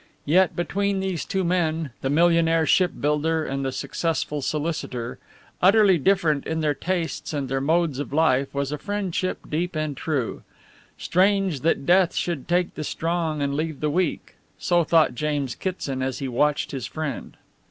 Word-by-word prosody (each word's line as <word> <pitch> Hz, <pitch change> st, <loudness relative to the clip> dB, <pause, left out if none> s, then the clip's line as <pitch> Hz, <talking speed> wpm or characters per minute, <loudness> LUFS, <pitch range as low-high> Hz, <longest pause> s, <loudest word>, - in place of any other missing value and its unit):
Yet, 180 Hz, +5 st, +3 dB
between 200 Hz, +3 st, -1 dB
these 190 Hz, -4 st, -2 dB
two 190 Hz, -1 st, -1 dB
men, 165 Hz, -4 st, 0 dB
the 135 Hz, -, -1 dB
millionaire 165 Hz, +1 st, +3 dB
ship 180 Hz, +3 st, +4 dB
builder 155 Hz, +2 st, +1 dB
and 135 Hz, 0 st, -3 dB
the 135 Hz, -, -1 dB
successful 150 Hz, +3 st, -2 dB
solicitor, 145 Hz, -6 st, -3 dB, 0.4 s
utterly 195 Hz, -1 st, +5 dB
different 155 Hz, -4 st, +2 dB
in 160 Hz, 0 st, -1 dB
their 150 Hz, -1 st, +2 dB
tastes 170 Hz, +2 st, -3 dB
and 140 Hz, -3 st, -2 dB
their 135 Hz, +1 st, -1 dB
modes 160 Hz, -1 st, +1 dB
of 145 Hz, -, -4 dB
life, 140 Hz, -3 st, +2 dB
was 140 Hz, 0 st, -2 dB
a 150 Hz, -, -3 dB
friendship 200 Hz, -3 st, -3 dB
deep 170 Hz, +3 st, -2 dB
and 155 Hz, -2 st, -2 dB
true. 135 Hz, -4 st, -2 dB, 0.6 s
Strange 190 Hz, -3 st, +2 dB
that 150 Hz, -1 st, 0 dB
death 180 Hz, +1 st, +4 dB
should 170 Hz, -7 st, -2 dB
take 175 Hz, 0 st, +1 dB
the 155 Hz, -, -5 dB
strong 160 Hz, -1 st, -1 dB
and 140 Hz, 0 st, -1 dB
leave 155 Hz, 0 st, -2 dB
the 150 Hz, -1 st, 0 dB
weak; 175 Hz, +1 st, -2 dB, 0.2 s
so 175 Hz, -1 st, +2 dB
thought 160 Hz, -3 st, +3 dB
James 145 Hz, -1 st, -2 dB
Kitson 145 Hz, -8 st, -4 dB
as 130 Hz, -1 st, -2 dB
he 135 Hz, -, -4 dB
watched 145 Hz, +4 st, +1 dB
his 130 Hz, -6 st, -4 dB
friend. 155 Hz, +2 st, -5 dB
160 Hz, 165 wpm, -24 LUFS, 140-175 Hz, 0.6 s, utterly